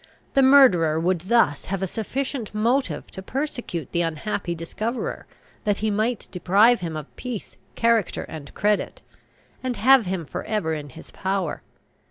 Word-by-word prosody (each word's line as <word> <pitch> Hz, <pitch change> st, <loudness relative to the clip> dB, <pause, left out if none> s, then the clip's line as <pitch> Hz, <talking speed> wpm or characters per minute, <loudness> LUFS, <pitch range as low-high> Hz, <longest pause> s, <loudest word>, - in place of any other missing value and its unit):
The 275 Hz, -, +5 dB
murderer 205 Hz, -, +6 dB
would 180 Hz, +2 st, -1 dB
thus 235 Hz, -12 st, +3 dB
have 195 Hz, 0 st, -3 dB
a -, -, +2 dB
sufficient 230 Hz, +3 st, -4 dB
motive 225 Hz, -, 0 dB
to 190 Hz, -, -8 dB
persecute 245 Hz, -, -4 dB
the 170 Hz, -, +1 dB
unhappy 170 Hz, +2 st, -2 dB
discoverer, 215 Hz, +9 st, -4 dB, 0.4 s
that 205 Hz, -2 st, +1 dB
he 215 Hz, 0 st, 0 dB
might 215 Hz, +3 st, -1 dB
deprive 200 Hz, +7 st, +4 dB
him 165 Hz, -3 st, -4 dB
of 155 Hz, -1 st, -9 dB
peace, 245 Hz, -5 st, -6 dB, 0.2 s
character, 230 Hz, -4 st, +2 dB
and 150 Hz, -3 st, -9 dB
credit, 210 Hz, 0 st, 0 dB, 0.6 s
and 255 Hz, -1 st, -2 dB
have 255 Hz, -3 st, +5 dB
him 180 Hz, -3 st, -2 dB
for -, -, -5 dB
ever 205 Hz, -7 st, -1 dB
in 150 Hz, -2 st, -5 dB
his 160 Hz, +5 st, -13 dB
power. 190 Hz, -4 st, -2 dB
200 Hz, 155 wpm, -24 LUFS, 170-235 Hz, 0.6 s, murderer